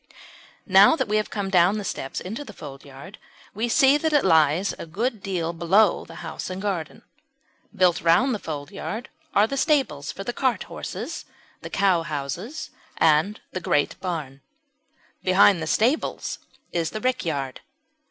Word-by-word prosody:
Now 195 +7 +7
that - - -1
we 215 +1 +1
have 215 - -1
come 200 -2 -3
down 185 +3 +4
the 210 - -4
steps 135 -7 -4
into 220 +10 -6
the 215 -8 -12
foldyard 140 +5 -11 0.3
we 225 +4 -2
see 270 +4 +5
that 315 +1 -1
it 290 - +4
lies 160 +2 +3
a - - -7
good 220 +6 -2
deal 175 -4 -2
below 175 +4 +3
the - - -12
house 160 - -5
and 185 0 -5
garden. 190 -6 -4 0.7
Built 180 -4 +3
round 175 - +4
the 215 - -3
foldyard 155 +9 -6 0.3
are 205 - +6
the 275 +5 -4
stables 265 - +1
for 195 - -7
the 240 - -3
cart 260 -1 0
horses, - - -6 0.4
the - - -7
cowhouses, 175 - -1 0.3
and 160 +7 +3
the 185 - -4
great 145 -3 0
barn. 155 -7 -5 0.8
Behind 185 -1 +5
the 160 - -3
stables 245 - 0 0.3
is 165 -2 0
the 215 - -6
rickyard. 155 - -2
185 Hz, 155 wpm, -24 LUFS, 160-215 Hz, 0.8 s, Now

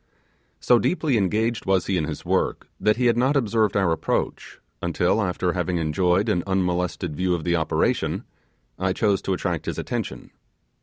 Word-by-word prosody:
So 120 - +4
deeply 155 -4 +1
engaged 110 +3 0
was 95 -2 +2
he 95 - 0
in 80 -4 0
his - - -6
work, - - 0
that 105 +1 +2
he 125 - +1
had 120 -1 +3
not 130 +4 +2
observed 110 -5 +1
our 95 -4 +2
approach, 80 - -2 0.2
until, 90 +5 +1
after 90 -2 -1
having, 90 0 -1
enjoyed 90 +5 +1
an 90 -5 +1
unmolested 90 -3 -1
view 90 +2 +1
of 80 - -5
the 85 +1 +1
operation, 80 -2 0 0.6
I 95 0 +1
chose 100 -1 +1
to 95 - -1
attract 90 -3 -2
his - - -3
attention. - - -4
95 Hz, 170 wpm, -24 LUFS, 90-110 Hz, 0.6 s, So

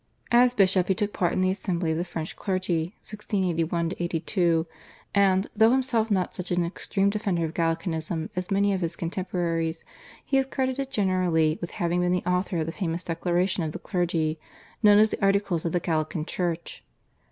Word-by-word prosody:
As 245 +1 +5
bishop 185 -3 +3
he 190 - +2
took 205 +2 -1
part 175 -2 +1
in 185 - 0
the 185 0 +3
Assembly 180 -4 -1
of 160 - -1
the - - 0
French 165 -3 -5
Clergy 185 -2 -1
(1681 175 -5 -1
82) 170 -1 +1 0.5
and, 195 -1 +3
though 220 +1 +6
himself 245 -3 +1
not 190 -3 0
such 180 0 -5
an 175 -1 +1
extreme 195 +3 0
defender 195 -5 -1
of 160 - -5
Gallicanism 165 -1 -2
as 180 +1 -3
many 200 0 +2
of 190 - -2
his 170 0 -2
contemporaries, 170 -2 -2 0.4
he 270 - +2
is 265 - 0
credited 265 0 -2
generally 180 -7 +1
with 170 - -4
having 175 +1 0
been 180 0 +1
the 180 - -1
author 180 0 0
of 160 - 0
the 165 - -3
famous 170 -1 -3
Declaration 175 +2 0
of 155 -2 -3
the - - -4
Clergy, 165 -4 -1 0.4
known 205 -2 +7
as 215 +1 +5
the - - -4
Articles 195 -4 +1
of 165 - 0
the 175 - +1
Gallican 155 -2 -1
Church. 170 -1 -3
180 Hz, 185 wpm, -26 LUFS, 165-200 Hz, 0.5 s, known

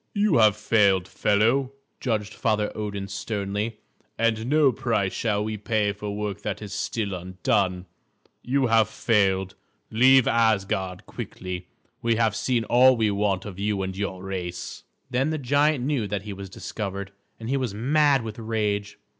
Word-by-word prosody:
"You 205 -6 +3
have 110 -2 +5
failed, 100 -4 +3
fellow," 115 +8 +1 0.3
judged 105 -4 -2
Father 105 -1 0
Odin 100 -2 -4
sternly, 100 +2 -3 0.4
"and 115 0 +1
no 145 -1 +4
price 105 -6 -1
shall 105 -2 0
we 110 0 -3
pay 105 -1 0
for 105 0 -5
work 105 -1 -4
that 105 -1 -3
is 105 -2 -7
still 100 0 -2
undone. 90 0 -1 0.6
You 135 +1 +1
have 115 -2 +3
failed. 95 -4 +1 0.4
Leave 130 +2 +6
Asgard 100 -5 +1
quickly; 90 -1 -6 0.3
we 115 0 +2
have 110 -2 +1
seen 120 0 0
all 125 +3 +5
we 110 -2 +2
want 100 -2 0
of 100 -2 -8
you 100 -1 0
and 95 0 -3
of 95 - -9
your 95 -2 -3
race." 90 -2 -5 0.3
Then 130 +4 +1
the 155 - -1
giant 145 0 +2
knew 135 -7 0
that 100 0 -3
he 105 -1 -6
was 100 0 -8
discovered, 100 0 -5 0.3
and 110 - -7
he 135 - 0
was 125 -6 -2
mad 140 +3 +3
with 110 0 -7
rage. 105 -2 -2
105 Hz, 165 wpm, -25 LUFS, 100-115 Hz, 0.6 s, Leave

